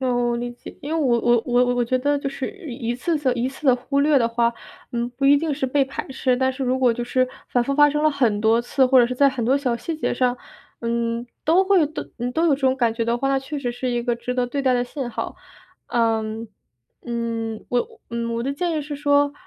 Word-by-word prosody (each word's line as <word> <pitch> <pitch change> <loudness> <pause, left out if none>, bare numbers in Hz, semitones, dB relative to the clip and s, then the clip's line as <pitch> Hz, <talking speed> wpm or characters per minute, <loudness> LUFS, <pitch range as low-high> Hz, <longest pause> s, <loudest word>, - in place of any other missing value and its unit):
哦， 255 -1 0 0.2
我 235 - 0
理 240 0 -3
解， 240 - -12
因 295 +3 -4
为 325 - +1
我 245 -5 +3
我 240 -1 +3
我 245 0 +3
我 245 - +2
觉 255 +2 0
得 285 +2 +1
就 275 - -3
是 270 -1 -4
一 280 - -7
一 - - 0
次 320 +7 -1
的 260 -4 +1
一 245 +2 -1
次 275 +2 -8
的 255 - +7
忽 275 +3 -1
略 290 -1 +4
的 230 -1 +2
话， 235 0 +1 0.4
嗯， 235 0 -1
不 275 - -2
一 280 +1 +7
定 310 0 -1
是 270 - -3
被 275 +2 +2
排 270 - -6
斥， 260 -1 0
但 260 0 +1
是 265 +1 -5
如 255 +1 +1
果 250 -3 +4
就 240 +1 -4
是 255 +1 +1 0.2
反 245 - +2
复 275 - -1
发 295 0 +6
生 295 +1 -1
了 310 - +4
很 235 -7 +1
多 225 +1 +3
次， 260 +2 +2
或 255 0 +6
者 240 - +4
是 250 - -3
在 280 +2 +5
很 260 -3 -3
多 260 +4 +3
小 255 -4 0
细 315 +7 -4
节 - - -1
上， 250 -1 +1 0.4
嗯， 235 0 -1 0.2
都 350 +5 +4
会 375 -6 +4
都 310 - -6
嗯， 245 +1 -2
都 325 - +1
有 290 - +4
这 275 - -8
种 265 0 +2
感 235 -3 +2
觉 230 0 -2
的 235 +1 +1
话， 270 +3 -1
那 270 - +2
确 285 +2 -5
实 245 -3 -2
是 245 +1 -3
一 240 -1 -1
个 240 -1 0
值 250 +1 -4
得 250 -1 +1
对 280 +3 -3
待 260 -2 +2
的 245 0 +1
信 260 -1 -5
号。 230 -1 -4 0.5
嗯， 225 -1 0 0.6
嗯， 230 -2 -3
我 245 -1 -2
嗯， 235 0 -2
我 235 - -2
的 275 +2 -1
建 345 +4 -1
议 310 -2 -1
是 295 +1 -6
说， 285 0 +2
255 Hz, 285 characters per minute, -22 LUFS, 235-280 Hz, 0.6 s, 的